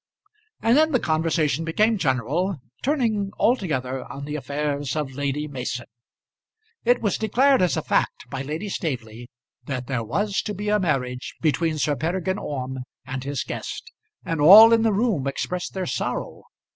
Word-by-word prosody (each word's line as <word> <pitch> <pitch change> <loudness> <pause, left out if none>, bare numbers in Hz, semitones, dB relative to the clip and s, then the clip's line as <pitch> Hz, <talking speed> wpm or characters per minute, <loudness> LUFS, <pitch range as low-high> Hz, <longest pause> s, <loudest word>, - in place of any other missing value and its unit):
And 230 +2 +4
then 315 +1 +4
the 255 - +4
conversation 160 -2 0
became 210 +6 +2
general, 150 - 0 0.2
turning 230 -8 0
altogether 135 - 0
on 140 +1 -7
the 150 +1 -4
affairs 145 -1 -2
of 150 -3 -2
Lady 145 +2 -2
Mason. 125 -3 -4 1.0
It 245 0 +2
was 205 - 0
declared 260 +5 +3
as 180 -7 +2
a - - -1
fact - - 0
by 135 -1 -3
Lady 155 +9 -4
Staveley 120 - -4 0.4
that 130 -3 -3
there 125 -3 -2
was 200 - -1
to 210 - -5
be 205 +2 -3
a 210 0 +3
marriage 130 -8 -2
between 160 0 +1
Sir 145 0 +1
Peregrine 180 +6 -1
Orme 130 -2 -4 0.3
and 130 0 -5
his 140 -2 -2
guest, - - -6 0.3
and 165 -3 -2
all 215 +9 +10
in 225 - +4
the 225 -1 +3
room 200 - +1
expressed 180 +7 -3
their 190 -1 -2
sorrow. - - -3
155 Hz, 160 wpm, -24 LUFS, 135-205 Hz, 1.0 s, all